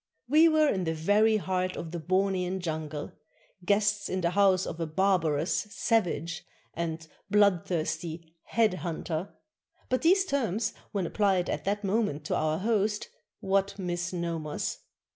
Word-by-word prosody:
We 310 Hz, +5 st, +6 dB
were 310 Hz, -1 st, +4 dB
in 190 Hz, -9 st, 0 dB
the 160 Hz, 0 st, -1 dB
very 210 Hz, +7 st, +3 dB
heart 185 Hz, -2 st, -1 dB
of 165 Hz, -, -6 dB
the 170 Hz, -, -4 dB
Bornean 185 Hz, +1 st, 0 dB
jungle, 155 Hz, -3 st, -4 dB, 0.5 s
guests 200 Hz, +1 st, +1 dB
in 185 Hz, -, -1 dB
the 170 Hz, 0 st, +1 dB
house 190 Hz, -1 st, +3 dB
of 165 Hz, -, -6 dB
a 165 Hz, -, -1 dB
barbarous 165 Hz, -3 st, +1 dB
"savage" 170 Hz, -8 st, 0 dB, 0.3 s
and 165 Hz, -1 st, -4 dB, 0.2 s
bloodthirsty 170 Hz, -5 st, 0 dB
"head 220 Hz, -2 st, +2 dB
hunter," 170 Hz, +1 st, -3 dB, 0.3 s
— -, -, -38 dB
but 255 Hz, -, +2 dB
these 375 Hz, +4 st, +4 dB
terms, 225 Hz, -, -1 dB, 0.2 s
when 195 Hz, -3 st, -1 dB
applied 190 Hz, -1 st, +1 dB
at -, -, -4 dB
that 205 Hz, +1 st, -1 dB
moment 195 Hz, -7 st, 0 dB
to -, -, -1 dB
our 155 Hz, 0 st, +1 dB
host, 210 Hz, +1 st, 0 dB, 0.3 s
what 195 Hz, +1 st, +1 dB
misnomers 170 Hz, -4 st, -3 dB
185 Hz, 145 wpm, -28 LUFS, 165-205 Hz, 0.5 s, We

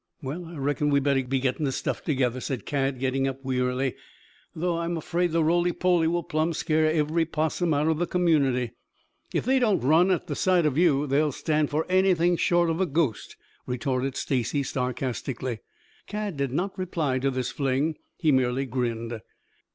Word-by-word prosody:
"Well, 155 Hz, +7 st, -5 dB
I 165 Hz, +1 st, -10 dB
reckon 145 Hz, +1 st, 0 dB
we'd 140 Hz, -1 st, +2 dB
better 135 Hz, -2 st, +2 dB
be 130 Hz, +1 st, -1 dB
getting 130 Hz, +4 st, -1 dB
the 140 Hz, -, +1 dB
stuff -, -, -3 dB
together," 130 Hz, -4 st, 0 dB
said 130 Hz, -2 st, -4 dB
Cad 135 Hz, -2 st, -1 dB
getting 135 Hz, +1 st, 0 dB
up 135 Hz, 0 st, -5 dB
wearily. 125 Hz, 0 st, 0 dB, 0.6 s
"Though 170 Hz, +1 st, -1 dB
I'm 170 Hz, 0 st, -2 dB
afraid 175 Hz, +2 st, -1 dB
the 165 Hz, 0 st, +2 dB
roly 175 Hz, +2 st, +2 dB
poly 175 Hz, -2 st, +2 dB
will 170 Hz, +1 st, 0 dB
plumb 155 Hz, +2 st, 0 dB
scare 155 Hz, 0 st, +1 dB
every 155 Hz, +1 st, +1 dB
'possum 160 Hz, +2 st, -1 dB
out 150 Hz, +1 st, +2 dB
of 160 Hz, -1 st, +1 dB
the 175 Hz, -, 0 dB
community." 140 Hz, -10 st, +2 dB, 0.6 s
"If -, -, -1 dB
they 265 Hz, +2 st, +3 dB
don't 220 Hz, -6 st, +2 dB
run 160 Hz, +8 st, +4 dB
at 185 Hz, -3 st, 0 dB
sight 180 Hz, +1 st, +2 dB
of 150 Hz, -4 st, +1 dB
you, 150 Hz, -4 st, +3 dB
they'll 145 Hz, +2 st, +2 dB
stand 150 Hz, +2 st, 0 dB
for 155 Hz, +2 st, 0 dB
anything 180 Hz, -2 st, +3 dB
short 175 Hz, 0 st, +2 dB
of 165 Hz, +3 st, -1 dB
a 190 Hz, -, +2 dB
ghost," 145 Hz, -6 st, -1 dB, 0.3 s
retorted 130 Hz, +1 st, -1 dB
Stacy 135 Hz, +2 st, -1 dB
sarcastically. 125 Hz, -1 st, -3 dB, 0.5 s
Cad 210 Hz, -4 st, -3 dB
did 140 Hz, -2 st, -2 dB
not 185 Hz, +8 st, -2 dB
reply 160 Hz, -8 st, -1 dB
to 135 Hz, +1 st, +1 dB
this 130 Hz, -1 st, -2 dB
fling. 140 Hz, +3 st, 0 dB, 0.2 s
He 160 Hz, -4 st, +2 dB
merely 130 Hz, 0 st, +1 dB
grinned. 115 Hz, -2 st, -3 dB
150 Hz, 180 wpm, -26 LUFS, 130-170 Hz, 0.6 s, run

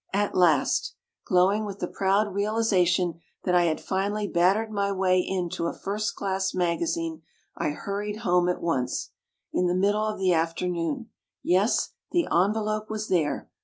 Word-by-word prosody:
At 205 Hz, +1 st, +1 dB
last! 165 Hz, -6 st, +2 dB, 0.3 s
Glowing 190 Hz, +4 st, +3 dB
with 200 Hz, -2 st, -5 dB
the -, -, -3 dB
proud 200 Hz, +1 st, +1 dB
realization 190 Hz, -5 st, +1 dB, 0.2 s
that 180 Hz, -, 0 dB
I 175 Hz, -1 st, +5 dB
had 160 Hz, -2 st, 0 dB
finally 205 Hz, +2 st, -1 dB
battered 195 Hz, +6 st, +2 dB
my 200 Hz, -1 st, 0 dB
way 185 Hz, -1 st, +2 dB
into 180 Hz, -2 st, -2 dB
a -, -, -5 dB
first 210 Hz, +2 st, -2 dB
class 190 Hz, -1 st, -2 dB
maga 170 Hz, -2 st, +1 dB
zine, 165 Hz, -1 st, -3 dB, 0.3 s
I -, -, -1 dB
hurried 205 Hz, +7 st, -4 dB
home 180 Hz, 0 st, +3 dB
at 180 Hz, -, -2 dB
once 130 Hz, -7 st, -1 dB, 0.2 s
— -, -, -53 dB
in 180 Hz, -, +2 dB
the 175 Hz, -, +1 dB
middle 205 Hz, +3 st, +2 dB
of 215 Hz, -, -3 dB
the 185 Hz, -2 st, +2 dB
afternoon. 170 Hz, -, -1 dB, 0.3 s
Yes, 190 Hz, +6 st, +2 dB, 0.2 s
the 345 Hz, -1 st, +2 dB
envelope 215 Hz, +3 st, +1 dB
was 215 Hz, 0 st, -4 dB
there. 160 Hz, -6 st, 0 dB
190 Hz, 165 wpm, -26 LUFS, 175-210 Hz, 0.3 s, I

